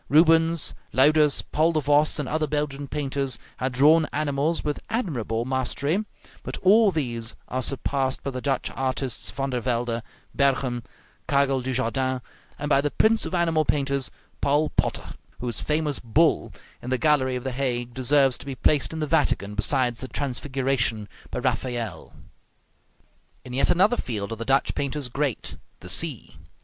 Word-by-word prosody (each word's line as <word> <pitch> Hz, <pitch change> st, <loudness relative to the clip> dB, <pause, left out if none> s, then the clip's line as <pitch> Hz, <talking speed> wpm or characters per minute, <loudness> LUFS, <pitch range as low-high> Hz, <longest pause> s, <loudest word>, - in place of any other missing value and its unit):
Rubens, 165 Hz, +1 st, +4 dB, 0.2 s
Luyders, 150 Hz, +2 st, +4 dB
Paul 160 Hz, +2 st, +1 dB
de 155 Hz, -, +2 dB
Vos, 145 Hz, +1 st, +3 dB
and 145 Hz, -3 st, -2 dB
other 155 Hz, 0 st, 0 dB
Belgian 145 Hz, -1 st, -2 dB
painters, 135 Hz, -3 st, -2 dB, 0.2 s
had 130 Hz, +1 st, -1 dB
drawn 155 Hz, +5 st, +5 dB
animals 150 Hz, +2 st, 0 dB
with 150 Hz, -1 st, -2 dB
admirable 120 Hz, -, -2 dB
mastery; 135 Hz, -, -1 dB, 0.4 s
but -, -, -6 dB
all 210 Hz, +3 st, +6 dB
these 120 Hz, -9 st, -3 dB
are 130 Hz, -, -2 dB
surpassed 135 Hz, +1 st, -1 dB
by 140 Hz, -, -3 dB
the 130 Hz, -1 st, -5 dB
Dutch 135 Hz, -1 st, -1 dB
artists 130 Hz, -6 st, -2 dB
Van 135 Hz, +7 st, -3 dB
der 125 Hz, -, 0 dB
Velde, 120 Hz, -1 st, -1 dB, 0.3 s
Berghem, 130 Hz, -3 st, +1 dB, 0.5 s
Karel 140 Hz, -1 st, +2 dB
du 130 Hz, +1 st, -3 dB
Jardin, 130 Hz, +1 st, 0 dB, 0.4 s
and 145 Hz, -, -4 dB
by 140 Hz, -2 st, +4 dB
the 145 Hz, -, 0 dB
prince 220 Hz, +8 st, +2 dB
of -, -, -3 dB
animal 165 Hz, -2 st, +2 dB
painters, 140 Hz, -3 st, 0 dB, 0.3 s
Paul 145 Hz, +2 st, +2 dB
Potter, -, -, -1 dB, 0.3 s
whose 120 Hz, -3 st, -3 dB
famous 150 Hz, -2 st, 0 dB
"Bull," 150 Hz, +8 st, +2 dB, 0.3 s
in 125 Hz, -, -6 dB
the 130 Hz, -, +1 dB
gallery 135 Hz, -3 st, +2 dB
of 125 Hz, -, -4 dB
the 130 Hz, -, -2 dB
Hague, 120 Hz, -2 st, -2 dB
deserves 135 Hz, +1 st, +3 dB
to -, -, -11 dB
be 135 Hz, -, -4 dB
placed 145 Hz, +4 st, +2 dB
in 160 Hz, -, -4 dB
the -, -, +1 dB
Vatican 115 Hz, -7 st, +1 dB
beside 120 Hz, +3 st, +1 dB
the 130 Hz, -, -6 dB
"Transfiguration" 130 Hz, -5 st, -1 dB, 0.2 s
by -, -, -5 dB
Raphael. 120 Hz, -10 st, -3 dB, 1.3 s
In 125 Hz, -, -8 dB
yet 130 Hz, -, +2 dB
another 195 Hz, +7 st, +4 dB
field 105 Hz, -3 st, -4 dB
are -, -, -2 dB
the 115 Hz, +1 st, -6 dB
Dutch 135 Hz, +2 st, +2 dB
painters 140 Hz, -1 st, -2 dB
great, 135 Hz, 0 st, -2 dB, 0.2 s
the -, -, -9 dB
sea. -, -, -1 dB
135 Hz, 160 wpm, -25 LUFS, 125-150 Hz, 1.3 s, all